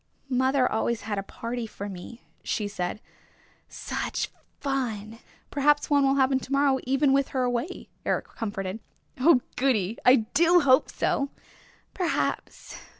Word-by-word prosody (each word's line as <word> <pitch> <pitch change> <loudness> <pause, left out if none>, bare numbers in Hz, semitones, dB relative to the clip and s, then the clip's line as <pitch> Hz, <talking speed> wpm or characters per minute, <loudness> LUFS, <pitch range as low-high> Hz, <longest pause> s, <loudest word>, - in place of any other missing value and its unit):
"Mother 260 0 +2
always 225 +1 -1
had 205 -2 -3
a - - -1
party 230 +3 -5
for 205 -1 -7
me," 200 +5 -9 0.2
she 210 - -1
said. 200 0 -4 0.7
"Such - - -3 0.3
fun!" 230 -6 -3 0.3
"Perhaps 290 +1 +2
one 285 -1 +5
will 270 - +3
happen 265 -1 +3
to 265 - -10
morrow 275 -1 +3
even 270 +2 +3
with 275 0 +3
her 260 -2 -1
away," 245 +8 -2 0.2
Eric - - -1
comforted. 200 -2 -4 0.4
"Oh, 265 -1 +5 0.2
goody! 230 -6 +1
I 250 - +8 0.2
do 345 +2 +5
hope 260 -3 +4
so!" 280 0 0 0.6
"Perhaps. 355 -3 -2
255 Hz, 140 wpm, -26 LUFS, 220-275 Hz, 0.7 s, I